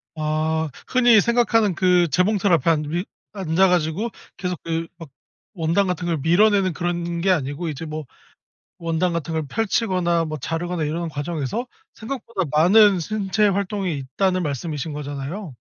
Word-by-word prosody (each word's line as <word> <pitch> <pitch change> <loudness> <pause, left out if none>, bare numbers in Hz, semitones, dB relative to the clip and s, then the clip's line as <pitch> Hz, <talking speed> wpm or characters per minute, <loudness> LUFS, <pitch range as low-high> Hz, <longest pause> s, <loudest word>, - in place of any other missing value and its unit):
아 155 +1 -1 0.2
흔히 240 -4 +5
생각하는 230 -3 +2
그 180 0 +3
재봉틀 200 +3 +2
앞에 165 0 +3
앉아 150 -2 +1
위 175 +5 -2 0.3
앉아가지고 180 +2 +1 0.3
계속 180 -3 -3
그 165 0 -2
막 165 -4 -10 0.5
원단 170 +4 +1
같은 180 -1 -2
걸 165 -2 0
밀어내는 190 +5 +3
그런 170 0 -2
게 195 - +1
아니고 145 0 -1
이제 155 +2 -5
뭐 155 -1 -5 0.7
원단 165 +1 0
같은 165 0 -3
걸 160 -1 -1
펼치거나 185 -4 0
뭐 155 -1 -4
자르거나 165 +4 -3
이러는 165 +2 -2
과정에서 155 - -3 0.3
생각보다 230 -4 -4
많은 190 +5 +5
신체 210 +3 0
활동이 195 -4 -1
있다는 185 +8 0
말씀이신 150 +1 -3
거잖아요. 145 - -6
175 Hz, 330 characters per minute, -22 LUFS, 155-195 Hz, 0.7 s, 흔히